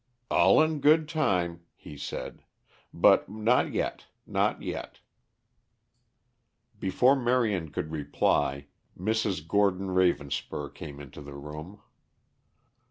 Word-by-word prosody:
"All 95 +3 +5
in 155 -1 -1
good 155 +2 +4
time," 90 - 0
he 75 - -11
said; 70 - -6 0.5
"but - - +4
not 110 +4 +1
yet, - - -3 0.2
not - - 0
yet." - - -6 1.8
Before 125 +8 +3
Marion 120 - +1
could 80 - -4
reply, 70 -2 0 0.3
Mrs. 100 -4 -1
Gordon 95 -1 +1
Ravenspur 75 -6 0
came 70 -1 -9
into 70 0 -11
the 70 0 -10
room. 75 +7 -9
95 Hz, 100 wpm, -28 LUFS, 75-110 Hz, 1.8 s, All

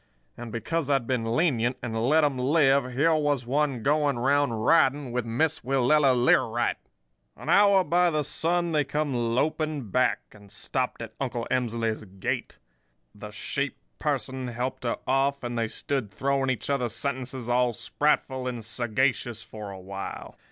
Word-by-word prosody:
And 120 -2 -8
because 140 +7 -2
I'd 135 -4 +2
been 115 -2 -1
lenient, 125 -6 +1
and 115 0 -1
let 155 +1 +4
'em 140 -3 +1
live, 135 -1 +3
here 155 +6 +3
was 145 -5 +1
one 135 -2 0
going 145 -2 +2
around 140 +2 +2
riding 135 +3 +2
with 120 -1 -2
Miss 155 +7 0
Willella 135 +2 +3
Learight! 120 -1 +2 0.6
"An - - -8
hour 200 -2 +6
by 175 -3 +2
sun 170 +4 0
they 150 -2 +2
come 145 +1 -2
loping 135 +2 -1
back, 125 +3 +2
and 100 -2 -16
stopped 125 +3 -3
at 110 -1 -9
Uncle 120 -3 -2
Emsley's 115 -3 -1
gate. 95 0 -4 0.6
The 105 +1 -9
sheep 140 +6 -3 0.2
person 130 -3 -2
helped 125 +2 -4
her 115 - 0
off; 135 +1 +1
and 120 0 -3
they 115 -1 0
stood 130 -1 -3
throwing 135 +5 0
each 130 +2 -2
other 125 -4 0
sentences 130 0 -3
all 125 0 +2
sprightful 130 +1 0
and 120 -3 -4
sagacious 120 0 -1
for 105 -2 -8
a 95 -1 -8
while. 95 +1 -7
130 Hz, 155 wpm, -26 LUFS, 115-145 Hz, 0.6 s, hour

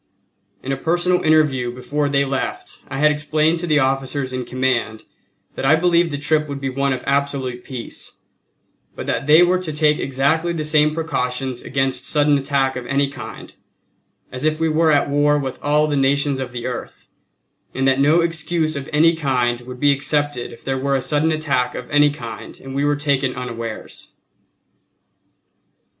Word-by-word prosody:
In 135 - -3
a 135 - -1
personal 175 +4 +1
interview 150 -6 +2
before 145 +4 -2
they 140 0 +2
left 135 0 -4
I 135 - -5
had 150 +2 +4
explained 155 +2 +1
to 175 - -4
the 155 -2 +3
officers 135 -1 -1
in 125 -1 -3
command 125 -3 -1 0.5
that - - -6
I 135 +4 +5
believed 170 0 +3
the 145 - -3
trip 155 +1 +1
would 140 -1 -5
be 135 -1 -3
one 140 +1 0
of 130 - -3
absolute 135 -3 -1
peace, 125 -3 -7 0.8
but - - -6
that 135 - -2
they 155 +3 +7
were 180 +1 +2
to 170 -4 -4
take 150 0 +2
exactly 145 +6 0
the 160 -2 -3
same 150 0 +3
precautions 130 -5 -2
against 135 -1 -2
sudden 150 -1 +3
attack 135 -1 0
of 125 -1 -6
any 140 +1 +1
kind 135 -3 -9 0.8
as 125 +2 -5
if 155 0 +1
we 165 0 +1
were 160 +1 +3
at 145 -1 +3
war 145 +1 +2
with 135 -3 -4
all 150 +1 +2
the 150 -1 -1
nations 140 0 +1
of 130 -2 -4
the 120 -1 -6
earth; 125 - -6 0.7
and 135 0 +1
that 135 0 +3
no 150 +5 +4
excuse 165 -1 -1
of 140 0 -5
any 165 +3 +4
kind 125 -6 0
would 125 0 -10
be 145 +1 +4
accepted 145 -2 0
if 115 - -14
there 135 0 -2
were 140 +1 0
a - - +2
sudden 150 +4 +1
attack 140 -6 0
of 125 - -6
any 145 0 +5
kind 120 -6 -8
and 135 0 -9
we 140 +1 -1
were 145 0 +2
taken 140 -3 0
unawares. 115 -3 -6
140 Hz, 180 wpm, -20 LUFS, 130-155 Hz, 0.8 s, they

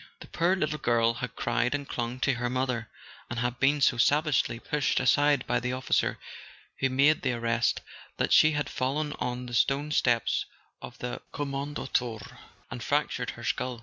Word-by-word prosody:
The - - -10
poor 175 +3 +1
little 155 -4 -2
girl 115 -1 +2
had 125 +1 -6
cried 120 +3 0
and 140 -1 -5
clung 120 +1 -3
to 140 - +2
her 120 0 -2
mother, 125 -3 -2 0.4
and 120 - -4
had 120 0 -2
been 140 +2 +3
so 125 - +4
savagely 145 0 +2
pushed 145 +4 0
aside 145 +2 +3
by 120 - +1
the 125 +1 -2
officer 130 0 0 0.6
who 135 - +2
made 140 +4 +3
the 125 -2 0
arrest 115 0 0 0.4
that - - +1
she 155 0 +6
had 145 0 -1
fallen 145 +3 -2
on 125 0 -3
the 120 - -8
stone 140 +4 +1
steps 120 -6 +1 0.3
of 125 - -9
the 125 0 -5
" - - -37
Kommandantur 135 -6 -3
" - - -32
and - - -6
fractured - - 0
her - - -9
skull. 125 -2 -2
125 Hz, 180 wpm, -28 LUFS, 120-145 Hz, 0.6 s, she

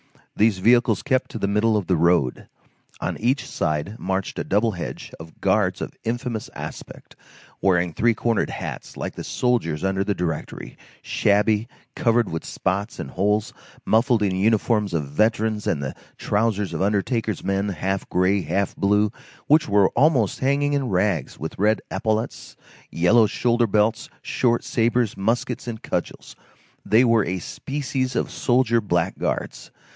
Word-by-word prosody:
These 105 -2 +3
vehicles 115 +2 +3
kept 130 -3 0
to - - -6
the 100 - -1
middle 105 +2 +2
of 100 - -2
the 90 - +2
road. 85 -6 +2 0.5
On - - -3
each 125 +5 0
side 75 +7 -2
marched 95 0 -2
a - - -1
double 110 +3 +1
hedge 90 -4 -6
of 80 0 -12
guards 95 -1 +1
of - - -5
infamous 120 -1 -3
aspect, - - -9 0.5
wearing 90 -3 +2
three 115 +6 +2
cornered 115 -1 0
hats, - - -6
like - - -4
the - - -7
soldiers 105 -12 0
under 95 0 +1
the 100 0 -1
Directory, 85 -3 -4 0.3
shabby, 105 +2 +2 0.3
covered 115 -1 +2
with 80 - -4
spots 100 +4 -2
and 65 - -6
holes, 105 - 0 0.3
muffled 115 0 +3
in 95 -2 +1
uniforms 105 0 +1
of 75 -3 -1
veterans 110 +6 0
and 70 - 0
the 65 - -3 0.2
trousers 105 -2 0
of - - -3
undertakers' 105 +1 0
men, 100 +1 0
half 95 +2 -3
gray, 95 +2 +2
half 90 +5 -1
blue, 105 +1 +2 0.3
which 155 -3 +4
were 100 -1 +4
almost 130 - +2
hanging 140 +2 +1
in 140 -3 0
rags, 90 -6 0
with 80 +4 -6
red 105 +1 +3
epaulets, 110 +3 -2 0.3
yellow 105 +7 +4
shoulder 120 +1 +1
belts, 105 +2 +1
short 120 -2 +1
sabres, 115 -1 +1
muskets, 115 +5 -1
and 110 -2 -6
cudgels; - - -4 0.5
they 110 +4 +4
were 115 -3 +3
a 90 +2 -2
species 130 - -3
of - - -1
soldier 120 -2 +2
blackguards. 85 -5 -2
105 Hz, 150 wpm, -23 LUFS, 95-115 Hz, 0.5 s, which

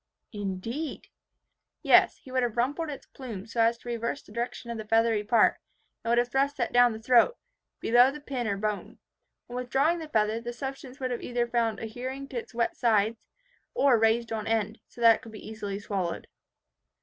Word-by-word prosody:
"Indeed!" 205 +9 -4 0.7
"Yes, - - +5
he 260 - -14
would 255 0 +1
have 240 -2 -1
rumpled 290 +7 0
its 280 - -7
plume, 225 -8 -8
so 230 0 -1
as 230 +1 +3
to 240 - -16
reverse 235 +3 -3
the - - -17
direction 235 +1 -4
of 230 - -5
the 215 - -7
feathery 225 -1 +3
part, 220 +1 +4 0.4
and 230 - -3
would 235 - +3
have 240 0 +2
thrust 280 +2 +1
that 240 - -1
down 245 0 +6
the 220 - -7
throat, 250 - +4 0.4
below 245 +2 +5
the 295 +2 -7
pin 265 -5 -3
or 200 -1 -1
bone. 210 0 -3 0.5
On 245 - -8
withdrawing 270 +7 +1
the 315 -2 -7
feather, 220 -2 +1
the 240 +1 -5
substance 270 +1 -7
would 255 -2 -2
be - - -7
either 240 -1 0
found 235 -2 0
adhering 255 +5 -5
to 255 - -5
its - - -11
wet 235 0 0
sides, 220 -1 +2 0.6
or 275 - +4
raised 225 +1 +2
on 220 -1 -3
end, 220 -1 0
so 240 - -13
that 230 -1 +7
it - - -19
could 225 - -11
be 215 - -10
easily 210 -2 -5
swallowed." 190 -5 -3
235 Hz, 200 wpm, -28 LUFS, 220-255 Hz, 0.7 s, that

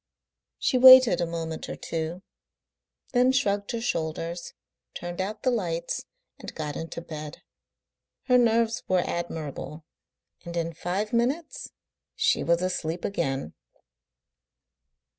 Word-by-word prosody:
She 255 - +1
waited 255 -7 +9
a 170 - 0
moment 165 -1 -5
or - - -4
two, 165 +3 -4 0.9
then 250 +1 +4
shrugged 205 -7 0
her 235 - -2
shoulders, 170 -3 -3 0.4
turned 175 +1 -4
out 210 +3 -4
the 255 - +3
lights, 170 -7 -2 0.3
and - - -9
got 150 -2 -4
into 165 +1 -6
bed. 155 -2 -8 0.8
Her 250 -1 +4
nerves 230 -1 +2
were 185 -1 +2
admirable, 160 -2 -5 0.6
and 170 0 -6
in 165 0 -2
five 190 +7 -3
minutes 270 +8 -1 0.5
she 450 0 +2
was 170 +1 +2
asleep 170 -2 -2
again. 135 - -2
175 Hz, 120 wpm, -26 LUFS, 165-235 Hz, 0.9 s, waited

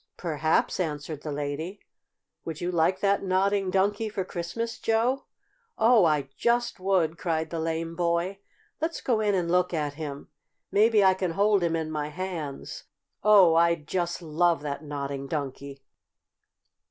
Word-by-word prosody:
"Perhaps," 155 0 0
answered 150 -3 -3
the 155 - -5
lady. 150 +7 -4 0.6
"Would 160 -2 -6
you 175 +1 -2
like 180 +2 +1
that 200 0 +2
Nodding 195 +1 +1
Donkey 205 +3 +1
for 195 -3 -3
Christmas, 195 +7 -4
Joe?" 235 +4 +1 0.5
"Oh, 225 -4 +5
I 150 -4 +1
just 240 -3 0
would!" 180 -4 +1
cried 160 -2 -1
the 165 - -3
lame 165 +1 -2
boy. 175 +3 0 0.4
"Let's 330 +1 -1
go 235 -4 0
in 210 -2 +2
and 170 -2 0
look 180 -1 +2
at 150 -2 -1
him. 145 -2 -7 0.4
Maybe 215 0 +4
I 190 -1 +6
can 185 -2 -2
hold 205 +1 +3
him 170 -1 +1
in 160 -1 -3
my 150 -1 -2
hands! 160 -4 -6 0.4
Oh, 200 -5 +7
I'd 170 -2 +2
just 175 0 -2
love 165 0 +1
that 145 +1 -4
Nodding 140 -2 -4
Donkey!" 140 -1 -5
170 Hz, 155 wpm, -27 LUFS, 155-195 Hz, 0.6 s, Oh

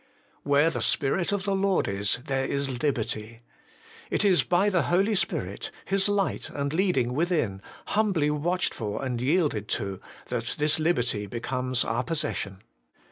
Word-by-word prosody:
' - - -35
Where 145 +3 +4
the - - -3
Spirit 160 +6 +1
of 200 -1 -1
the 200 -1 0
Lord 195 -1 +2
is, 100 +2 +1
there 135 -1 0
is 135 -3 -2
liberty.' 115 -4 -2 0.7
It - - +1
is 185 -3 +5
by 180 +3 +2
the 185 -4 +3
Holy 195 +5 +3
Spirit, 195 - -2 0.2
His 195 +1 +2
light 200 -2 0
and 140 0 -3
leading 160 -9 +2
within, 150 - 0 0.2
humbly 195 -9 +2
watched 175 +5 0
for 110 +3 -4
and 125 -2 -2
yielded 140 - +1
to, 100 -1 -5 0.3
that 120 -2 -2
this 150 +1 +2
liberty 120 -10 +1
becomes 125 +3 -1
our 115 +2 0
possession. 145 - -3
145 Hz, 155 wpm, -27 LUFS, 120-180 Hz, 0.7 s, is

